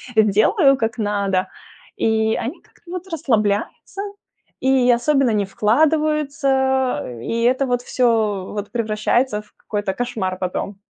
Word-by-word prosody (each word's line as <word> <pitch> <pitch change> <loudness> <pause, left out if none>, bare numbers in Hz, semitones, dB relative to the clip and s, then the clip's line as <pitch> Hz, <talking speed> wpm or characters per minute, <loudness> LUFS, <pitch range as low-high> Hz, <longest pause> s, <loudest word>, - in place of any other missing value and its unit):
делаю, 220 - +4
как 225 -1 -2
надо. 200 -3 0 0.5
И 220 0 +1
они 240 - -4
как-то 345 - -18
вот 365 +1 -6
расслабляются, 230 - -1 0.6
и 260 -1 +4
особенно 260 +1 +2
не 210 -2 +1
вкладываются. 270 - +1 0.2
И 230 0 -1
это 260 +3 +2
вот 245 -1 0
всё 220 -7 0
вот 205 -1 -5
превращается 220 +1 0
в 210 - -26
какой-то 205 -2 -3
кошмар 215 -5 -3
потом. 185 +2 -3
230 Hz, 120 wpm, -20 LUFS, 210-265 Hz, 0.6 s, делаю